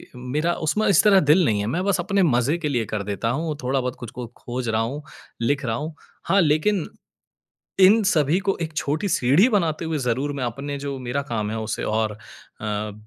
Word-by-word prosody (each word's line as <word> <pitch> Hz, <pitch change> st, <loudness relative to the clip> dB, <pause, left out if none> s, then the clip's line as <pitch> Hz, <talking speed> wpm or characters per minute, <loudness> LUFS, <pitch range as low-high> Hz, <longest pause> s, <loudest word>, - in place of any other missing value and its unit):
मेरा 145 Hz, +7 st, -1 dB
उसमें 215 Hz, +7 st, +1 dB
इस 195 Hz, -1 st, +5 dB
तरह 205 Hz, -3 st, +6 dB
दिल 170 Hz, +4 st, +6 dB
नहीं 105 Hz, -6 st, +1 dB
है। 100 Hz, -, -2 dB
मैं 180 Hz, -, 0 dB
बस 200 Hz, -2 st, +1 dB
अपने 195 Hz, +3 st, +1 dB
मज़े 135 Hz, 0 st, +2 dB
के 160 Hz, -3 st, -2 dB
लिए 120 Hz, -5 st, 0 dB
कर 105 Hz, -, -1 dB
देता 100 Hz, +3 st, -2 dB
हूँ 160 Hz, -2 st, -2 dB
थोड़ा 135 Hz, +2 st, +1 dB
बहुत 125 Hz, -1 st, -3 dB
कुछ 120 Hz, -3 st, -8 dB
को 125 Hz, -1 st, -7 dB
खोज 120 Hz, -1 st, -4 dB
रहा 110 Hz, 0 st, +1 dB
हूँ 135 Hz, +6 st, -3 dB, 0.4 s
लिख 140 Hz, +4 st, 0 dB
रहा 115 Hz, -2 st, -1 dB
हूँ। 155 Hz, +5 st, -5 dB, 0.3 s
हाँ, 195 Hz, -, +3 dB
लेकिन 160 Hz, +4 st, +1 dB, 0.9 s
इन 205 Hz, +4 st, +7 dB
सभी 160 Hz, -3 st, +2 dB
को 195 Hz, -, +2 dB
एक 160 Hz, -, -4 dB
छोटी 155 Hz, +6 st, -1 dB
सीढ़ी 150 Hz, -, +4 dB
बनाते 170 Hz, -9 st, 0 dB
हुए 160 Hz, -1 st, -2 dB
ज़रूर 130 Hz, +2 st, -1 dB
मैं 140 Hz, -3 st, -3 dB
अपने 140 Hz, +4 st, -4 dB
जो 140 Hz, -1 st, -5 dB
मेरा 130 Hz, +2 st, -2 dB
काम 105 Hz, -2 st, -1 dB
है 110 Hz, -, -3 dB
उसे 110 Hz, +1 st, -3 dB
और 110 Hz, -1 st, 0 dB
अ, 105 Hz, 0 st, -7 dB
140 Hz, 210 wpm, -23 LUFS, 120-165 Hz, 0.9 s, इन